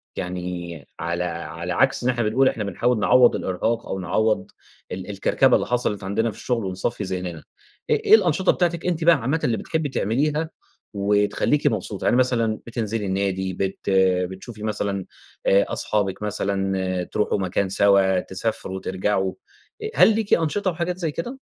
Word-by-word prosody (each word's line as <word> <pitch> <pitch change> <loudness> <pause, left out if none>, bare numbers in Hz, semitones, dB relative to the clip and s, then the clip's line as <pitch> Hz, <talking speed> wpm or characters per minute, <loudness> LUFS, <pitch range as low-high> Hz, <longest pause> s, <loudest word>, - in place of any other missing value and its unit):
يعني 90 -4 -5
على 85 +1 -2
على 85 0 -4
عكْس 130 +5 +2
إن 125 - +2
إحنا 120 -2 0
بنقول 125 +5 +3
إحنا 105 - -3
بنحاول 110 +4 0
نعوّض 125 +3 +5
الإرهاق 115 +5 -2
أو 95 - -3
نعوّض 110 +5 0 0.4
ال 95 +2 -6
الكركبة 100 -1 +3
اللي - - 0
حصَلِت 120 -5 -1
عندنا 110 +4 0
في - - -11
الشغل 120 -4 -2
ونصفّي 95 +3 -2
ذهننا. 90 -3 -4 0.5
إ - - +4
إيه - - +6
الأنشطة 185 -3 +3
بتاعتِك 170 -1 -1
أنتِ 170 -2 0
بقى 170 0 +6
عامةً 140 +4 -1
اللي 115 -3 +1
بتحبي 160 -3 -2
تعمليها 150 +8 0 0.4
وتخلّيكِ 105 +8 +1
مبسوطة؟ 105 -4 -2
يعني - - +3
مثلًا 115 -4 +1
بتنزِلي 115 -2 -2
النادي، 95 -1 -1
بت 95 +2 -3 0.4
بتشوفي 105 +3 -9
مثلًا 100 -3 -2 0.4
آآ 100 +1 +4
أصحابِك 100 -2 -1
مثلًا، 95 -3 -1
ترُوحوا 105 +3 -1
مكان 95 +1 -1
سَوا، 95 -1 +4
تسافروا، 95 0 -3
ترجَعوا، 95 0 -1 0.5
أ 435 - -2
هل 220 - +6
ليكِ 220 -2 0
أنشطة 175 +4 +1
وحاجات 170 +2 -3
زي 165 -4 -2
كده؟ 245 - -5
105 Hz, 155 wpm, -23 LUFS, 95-130 Hz, 0.5 s, إيه